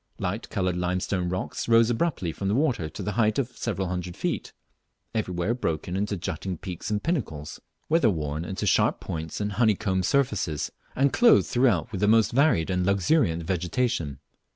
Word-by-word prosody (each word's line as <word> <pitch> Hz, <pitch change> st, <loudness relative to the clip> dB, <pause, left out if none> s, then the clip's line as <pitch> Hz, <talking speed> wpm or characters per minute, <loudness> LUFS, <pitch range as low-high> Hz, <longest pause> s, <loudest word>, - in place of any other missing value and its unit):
Light 100 Hz, +6 st, -3 dB
coloured 90 Hz, -4 st, -1 dB
limestone 90 Hz, 0 st, -1 dB
rocks 90 Hz, +1 st, -3 dB
rose 115 Hz, 0 st, +5 dB
abruptly 120 Hz, -, -1 dB
from 95 Hz, +4 st, -4 dB
the 100 Hz, -, +1 dB
water 125 Hz, -, +1 dB
to 100 Hz, -, -7 dB
the 105 Hz, -, -2 dB
height 110 Hz, 0 st, +2 dB
of 125 Hz, -2 st, -2 dB
several 95 Hz, -5 st, -2 dB
hundred 90 Hz, -1 st, -4 dB
feet, -, -, -2 dB, 0.6 s
everywhere 95 Hz, -1 st, -1 dB
broken 90 Hz, -6 st, -2 dB
into 100 Hz, +1 st, -1 dB
jutting 90 Hz, +2 st, -4 dB
peaks 90 Hz, +2 st, -6 dB
and 105 Hz, -1 st, -1 dB
pinnacles, 100 Hz, -, -3 dB, 0.3 s
weather 155 Hz, -7 st, +4 dB
worn 75 Hz, -3 st, -2 dB
into 95 Hz, +2 st, -4 dB
sharp -, -, +3 dB
points 80 Hz, -1 st, -5 dB
and 105 Hz, 0 st, -1 dB
honeycombed 100 Hz, -4 st, +1 dB
surfaces, 105 Hz, -, 0 dB, 0.2 s
and 135 Hz, +1 st, +2 dB
clothed 240 Hz, -1 st, +6 dB
throughout 120 Hz, -4 st, +2 dB
with 100 Hz, -3 st, -4 dB
a 105 Hz, -, +3 dB
most 110 Hz, 0 st, +4 dB
varied 125 Hz, -, +3 dB
and 90 Hz, 0 st, +1 dB
luxuriant 95 Hz, -, +2 dB
vegetation. 90 Hz, -, -1 dB
100 Hz, 170 wpm, -26 LUFS, 90-115 Hz, 0.6 s, clothed